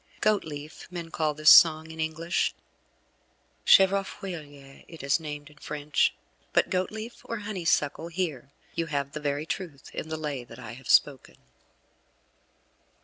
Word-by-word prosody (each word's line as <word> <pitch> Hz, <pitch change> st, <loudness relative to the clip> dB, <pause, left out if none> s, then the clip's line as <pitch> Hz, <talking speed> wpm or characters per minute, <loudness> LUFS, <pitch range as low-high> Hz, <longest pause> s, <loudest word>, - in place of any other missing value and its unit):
Goatleaf, 160 Hz, -8 st, -2 dB
men 170 Hz, -2 st, -7 dB
call 155 Hz, -3 st, 0 dB
this 155 Hz, +1 st, +7 dB
song 160 Hz, -2 st, +7 dB
in 160 Hz, -, -11 dB
English. 160 Hz, +2 st, -1 dB, 1.1 s
Chèvrefeuille 175 Hz, -8 st, +2 dB
it 165 Hz, -4 st, -11 dB
is 140 Hz, +3 st, +2 dB
named 150 Hz, -1 st, -7 dB
in 150 Hz, -, -21 dB
French; 150 Hz, -1 st, 0 dB, 0.4 s
but -, -, +3 dB
Goatleaf 215 Hz, +5 st, -3 dB
or 230 Hz, -, -4 dB
Honeysuckle, 165 Hz, -6 st, 0 dB
here 165 Hz, -7 st, -3 dB, 0.2 s
you 165 Hz, -, -2 dB
have 140 Hz, -2 st, -2 dB
the 150 Hz, -, -5 dB
very 145 Hz, 0 st, -2 dB
truth 165 Hz, -3 st, -6 dB
in 160 Hz, -, -5 dB
the 160 Hz, -, -3 dB
Lay 145 Hz, -5 st, -4 dB
that 115 Hz, -1 st, -13 dB
I 115 Hz, -4 st, -8 dB
have 125 Hz, +1 st, -11 dB
spoken. 140 Hz, -3 st, +3 dB
155 Hz, 140 wpm, -27 LUFS, 145-170 Hz, 1.1 s, this